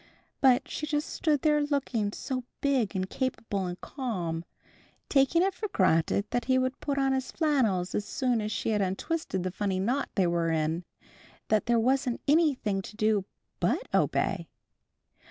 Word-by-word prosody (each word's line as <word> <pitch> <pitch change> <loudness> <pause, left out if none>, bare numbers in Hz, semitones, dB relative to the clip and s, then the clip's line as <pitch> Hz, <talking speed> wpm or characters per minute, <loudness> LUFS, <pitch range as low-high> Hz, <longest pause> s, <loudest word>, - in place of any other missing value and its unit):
But 255 -2 +4
she 305 - -4
just 300 0 -1
stood 300 -4 0
there 300 -1 +4
looking 270 -8 0
so 255 +3 -4 0.2
big 260 -8 +1
and 185 0 -1
capable 220 -6 -2
and 180 0 -5
calm, 180 - -3 0.7
taking 280 +5 +4
it 390 0 +1
for 425 +4 -4
granted 185 - +2
that 245 -1 0
he 260 0 +3
would 255 +1 0
put 280 -1 -2
on 270 -1 +2
his 265 -1 -2
flannels 240 - +1
as 210 - 0
soon 245 +1 0
as 210 0 -3
she - - -2
had 210 -1 +1
untwisted 190 - -2
the 185 - -2
funny 195 -1 -1
knot 250 +8 0
they 190 - +3
were 170 -1 +1
in, 160 +2 0 0.6
that 215 +1 +2
there 235 -1 +4
wasn't 255 +1 +1
anything 280 - +2
to 205 - -10
do 215 -2 +1 0.3
but - - 0
obey. - - +1
240 Hz, 170 wpm, -28 LUFS, 195-275 Hz, 0.7 s, But